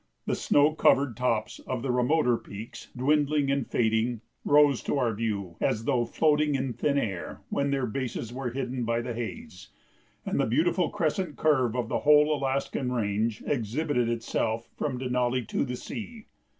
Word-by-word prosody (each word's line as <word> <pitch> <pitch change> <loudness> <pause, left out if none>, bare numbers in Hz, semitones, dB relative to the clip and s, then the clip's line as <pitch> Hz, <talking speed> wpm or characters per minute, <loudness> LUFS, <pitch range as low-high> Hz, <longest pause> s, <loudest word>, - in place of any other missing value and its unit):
The - - 0
snow 145 +2 +3
covered 140 -5 +3
tops 115 -4 -1
of 125 -2 -3
the 135 - 0
remoter 125 +1 +2
peaks, 110 0 -9
dwindling 145 +1 +2
and 140 -3 0
fading, 110 0 +1 0.2
rose 145 -3 +5
to - - 0
our 120 -4 +1
view 100 -5 -3
as 110 +1 0
though 125 -3 +2
floating 150 +2 +2
in 130 -2 -1
thin 145 +3 0
air 95 - -3
when 140 0 0
their 135 -2 0
bases 120 -1 -4
were 130 -1 -3
hidden 125 0 -3
by 115 +1 0
the 120 0 -4
haze, 220 - -7 0.6
and - - -1
the - - +2
beautiful - - +2
crescent 185 -7 -1
curve 130 -7 +2
of 120 -3 -1
the - - -1
whole 150 +1 +5
Alaskan 135 -1 -1
range 110 -1 -1
exhibited 125 0 0
itself 115 -1 -2
from 135 -4 -2
Denali 125 -2 0
to - - 0
the 125 -2 -3
sea. 225 - -7
125 Hz, 165 wpm, -27 LUFS, 115-145 Hz, 0.6 s, rose